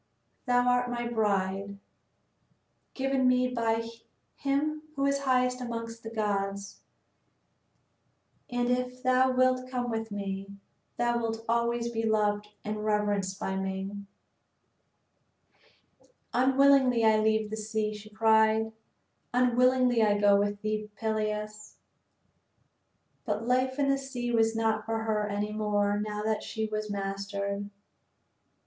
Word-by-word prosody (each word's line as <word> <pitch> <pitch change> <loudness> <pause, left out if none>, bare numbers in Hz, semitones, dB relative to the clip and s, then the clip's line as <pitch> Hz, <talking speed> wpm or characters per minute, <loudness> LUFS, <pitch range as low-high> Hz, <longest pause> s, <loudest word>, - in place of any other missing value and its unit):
Thou 245 0 +3
art 245 0 +2
my 240 -1 -2
bride, 200 -3 -1 1.2
given 270 -1 +1
me 255 0 +3
by 230 -2 0 0.5
him 295 +2 -1
who 275 0 0
is 280 0 +2
highest 255 -2 +1
amongst 230 -1 -5
the 225 - -7
gods, 200 -2 -2 1.7
and 245 0 0
if 250 0 -2
thou 255 0 +4
wilt 255 0 +2
come 245 -2 -2
with 225 -1 -3
me, 200 -1 -5 0.4
thou 240 0 +1
wilt 225 -1 -3
always 235 0 +1
be 225 -1 -2
loved 210 -2 +1 0.2
and 210 0 -3
reverenced 205 -2 0
by 190 - -2
me." 190 0 -3 2.4
"Unwillingly 260 -1 +4
I 220 0 +5
leave 220 0 +1
the - - -2
sea," 215 0 -2
she 210 0 -10
cried, 220 0 +3 0.6
"unwillingly 250 -1 +3
I 205 -1 +3
go 205 -1 +5
with 205 +1 0
thee, 215 0 -2
Peleus." 215 -1 -3 1.5
But 215 -1 -2
life 255 +1 +1
in 285 -1 +1
the 275 0 +2
sea 250 -3 -4
was 225 -1 +2
not 220 -1 +1
for 225 0 -2
her 215 -1 0
any 205 +1 -2
more 205 -1 +1
now 210 0 -3
that 220 0 0
she 220 0 -3
was 215 0 -3
mastered. 200 0 -3
220 Hz, 125 wpm, -29 LUFS, 210-250 Hz, 2.4 s, I